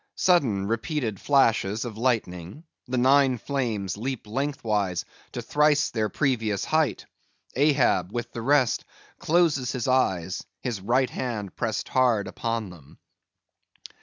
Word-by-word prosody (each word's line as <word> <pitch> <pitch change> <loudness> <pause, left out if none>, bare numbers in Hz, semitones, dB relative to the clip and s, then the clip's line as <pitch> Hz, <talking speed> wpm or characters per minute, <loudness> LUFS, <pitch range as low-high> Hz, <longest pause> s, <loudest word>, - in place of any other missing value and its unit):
[_Sudden, 120 - +2
repeated 115 - -2
flashes 115 -6 +2
of 115 -3 -6
lightning; 110 - -2 0.2
the 125 +1 -2
nine 130 0 +4
flames 110 - -2
leap 125 +1 -4
lengthwise 110 -7 -1 0.3
to - - -4
thrice 150 0 +2
their 110 -2 -1
previous 110 -8 0
height; 155 -2 0 0.5
Ahab, 130 - +2
with 120 0 -4
the 115 - -5
rest, 135 0 +2 0.4
closes 155 -7 +2
his 125 -2 -3
eyes, 95 -9 +1 0.2
his 115 -6 -3
right 125 +5 +1
hand 110 -7 -4
pressed 110 -3 -2
hard 120 -6 +2
upon 115 -1 -3
them. 75 -5 -16
120 Hz, 125 wpm, -25 LUFS, 105-135 Hz, 0.5 s, nine